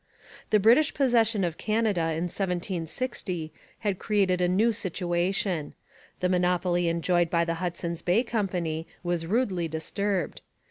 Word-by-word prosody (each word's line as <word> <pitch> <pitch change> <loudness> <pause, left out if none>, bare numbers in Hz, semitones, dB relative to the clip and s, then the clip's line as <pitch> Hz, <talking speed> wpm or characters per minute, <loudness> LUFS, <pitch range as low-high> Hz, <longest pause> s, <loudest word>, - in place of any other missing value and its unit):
The 215 - +4
British 235 +9 +5
possession 230 -6 +3
of 170 -2 -2
Canada 215 -4 +1
in 165 0 -1
1760 180 -1 -3 0.3
had 200 -4 -1
created 195 -4 +1
a 180 - +3
new 205 +6 +3
situation. 180 -3 -1 0.5
The 180 - +3
monopoly 180 -1 +1
enjoyed 170 0 +1
by 170 0 +2
the 165 - -1
Hudson's 170 -1 -3
Bay 185 +8 +2
Company 180 -9 -2 0.2
was 175 -2 -1
rudely 190 -5 0
disturbed. 185 +4 -2
180 Hz, 130 wpm, -27 LUFS, 170-210 Hz, 0.5 s, British